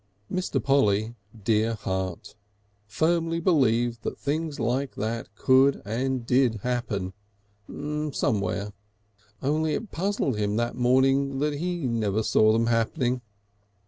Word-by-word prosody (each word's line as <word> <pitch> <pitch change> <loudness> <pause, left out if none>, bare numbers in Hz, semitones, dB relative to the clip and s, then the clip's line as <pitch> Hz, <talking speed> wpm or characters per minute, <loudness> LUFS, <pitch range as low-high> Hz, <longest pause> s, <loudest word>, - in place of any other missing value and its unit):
Mr. 185 0 -1
Polly, 110 -5 +2 0.3
dear 110 +1 +2
heart! 95 -3 -4 0.5
firmly 165 +9 +1
believed 120 -9 +2
that - - -4
things 155 +1 -2
like 125 +4 -1
that 115 +2 -3
could 130 +4 +4
and 125 +3 -2
did 125 -2 +3
happen 110 -7 -2 1.0
somewhere. 105 -5 -1 0.7
Only 155 +3 +1
it 220 - -5
puzzled 180 - -1
him 105 0 0
that 120 +1 0
morning 135 +2 +2
that 150 +2 0
he 175 -2 -2
never 110 -3 0
saw 110 0 +4
them 115 +1 +2
happening. 120 +2 0
125 Hz, 115 wpm, -26 LUFS, 110-140 Hz, 1.0 s, could